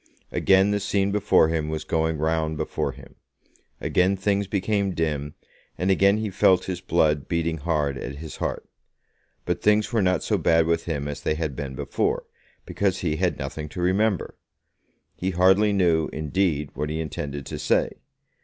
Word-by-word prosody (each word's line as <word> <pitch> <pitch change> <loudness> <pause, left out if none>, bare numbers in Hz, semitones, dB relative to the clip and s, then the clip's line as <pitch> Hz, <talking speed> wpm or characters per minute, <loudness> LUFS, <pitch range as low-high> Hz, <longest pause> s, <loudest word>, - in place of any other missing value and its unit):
Again 95 +1 +4
the 105 - +1
scene 100 0 0
before 100 -5 +3
him 80 -2 -1
was 80 0 -3
going 80 -1 0
round 80 0 0
before - - -2
him; - - -14 0.7
again 95 +2 +2
things 100 0 0
became 100 -1 0
dim, 75 -3 -2 0.4
and 95 +2 +1
again 100 +2 +4
he 110 -2 -3
felt 95 -2 +3
his 90 -2 -4
blood 75 -4 +1
beating 85 -1 -1
hard 75 -4 -1
at 70 - -6
his 80 +2 -8
heart. - - -3 0.8
But 90 0 -1
things 105 +2 +2
were 115 - +3
not 90 -1 +1
so - - 0
bad 80 0 +3
with 85 0 0
him 75 -4 -3
as 75 - -5
they 75 - 0
had 75 -4 -3
been 65 -1 -5
before, - - -1 0.4
because 95 -2 -1
he 80 -3 -1
had - - 0
nothing 75 +3 -5
to 90 - -8
remember. 95 +3 +1 0.8
He 95 - -3
hardly 95 +3 +4
knew, 85 -5 +2
indeed, 75 -1 -1
what 75 - -3
he 80 +1 -3
intended 70 -3 -5
to - - -6
say. - - +1
85 Hz, 170 wpm, -24 LUFS, 75-95 Hz, 0.8 s, Again